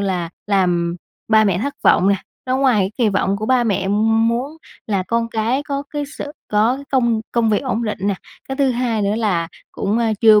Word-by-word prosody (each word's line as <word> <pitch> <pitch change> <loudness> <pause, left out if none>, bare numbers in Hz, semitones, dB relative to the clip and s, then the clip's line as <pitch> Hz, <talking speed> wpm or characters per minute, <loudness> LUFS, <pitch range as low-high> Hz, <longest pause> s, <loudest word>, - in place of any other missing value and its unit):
là, 185 -4 -1 0.2
làm 175 -4 +1 0.3
ba 220 -1 +5
mẹ 190 -4 +1
thất 280 +7 -3
vọng 185 - +5
nè, 200 - +3 0.3
nó 255 +1 +1
ngoài 260 -6 +3
cái 190 +1 0
kỳ 230 - +3
vọng 200 0 +1
của 215 +1 -4
ba 255 -2 +3
mẹ 200 -3 0
muốn 225 +7 +1 0.3
là 200 -4 0
con 230 +4 -1
cái 230 +5 0
có 280 -1 -3
cái 290 -1 -3
sự 290 - -5 0.2
có 220 +4 +2
cái 280 - -9
công 235 -4 +2
công 230 -2 +2
việc 210 - +3
ổn 235 -3 -1
định 210 - -3
nè, 200 0 +1 0.3
cái 270 - -3
thứ 275 -2 +2
hai 235 -3 0
nữa 200 +1 +1
là 180 -7 0 0.2
cũng, 205 +4 -1
ơ, 235 - +1 0.2
chưa 215 -2 +7
220 Hz, 220 wpm, -19 LUFS, 200-245 Hz, 0.3 s, chưa